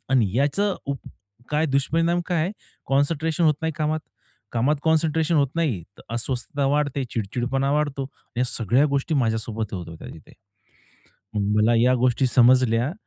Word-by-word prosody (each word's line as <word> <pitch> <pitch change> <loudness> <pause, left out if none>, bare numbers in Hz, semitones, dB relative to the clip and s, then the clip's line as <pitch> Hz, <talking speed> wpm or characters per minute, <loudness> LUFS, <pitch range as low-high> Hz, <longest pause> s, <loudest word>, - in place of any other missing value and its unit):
आणि 115 -8 +3
याचं 185 +9 +1
उप 140 -1 -2 0.5
काय 150 +2 +1
दुष्परिणाम 165 +5 +1
काय 175 -3 +1
आहे. 185 +5 -2 0.3
कॉन्सन्ट्रेशन 155 +4 +1
होत 155 -2 +4
नाही 160 - 0
कामात, 155 0 0 0.5
कामात 130 +6 +2
कॉन्सन्ट्रेशन 160 0 +2
होत 140 -3 +3
नाही. 135 - 0 0.2
तर - - -13
अस्वस्थता 130 +3 -2
वाढते, 145 -1 0
चिड-चिडपणा 125 +6 -1
वाढतो. 145 -2 -1 0.3
या 125 - +2
सगळ्या 120 +4 +2
गोष्टी 150 +4 -1
माझ्यासोबत 110 -4 -1
होत 85 -3 -6
होत्या 80 - -10
तिथे. 80 - -15 1.1
मला 105 +3 +2
या 125 +1 +4
गोष्टी 130 +1 +2
समजल्या 125 +2 +4
135 Hz, 140 wpm, -23 LUFS, 120-155 Hz, 1.1 s, होत